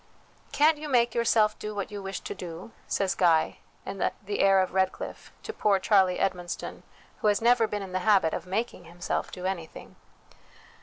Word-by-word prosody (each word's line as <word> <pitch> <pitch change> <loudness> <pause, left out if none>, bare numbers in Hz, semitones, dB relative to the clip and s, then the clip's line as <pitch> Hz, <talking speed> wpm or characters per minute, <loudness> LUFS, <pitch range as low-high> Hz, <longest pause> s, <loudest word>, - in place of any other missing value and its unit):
" - - -32
Can't 305 0 +5
you 300 0 -6
make 240 -3 +3
your 235 - +1
self 215 -2 +3
do 210 0 -5
what 200 +1 -4
you 205 -1 -6
wish 195 -1 -5
to - - -5
do? 175 +4 -8
" - - -31
says 195 -2 0
Guy, 165 -3 +2 0.3
in 195 0 -6
the 205 +2 -2
Heir 195 -1 +5
of 185 - -1
Redclyffe, 190 0 -2
to 445 - -6
poor 205 - +2
Charlie 190 -2 +3
Edmonston, 180 -2 -3 0.4
who - - 0
has 205 -1 +3
never 235 -1 +4
been 205 -1 -4
in 190 - -8
the 185 - -1
habit 190 -5 +3
of - - -4
making 195 -2 -3
himself 175 +1 -4
do 180 - -7
anything. 175 -4 -5
195 Hz, 200 wpm, -27 LUFS, 185-215 Hz, 0.4 s, Can't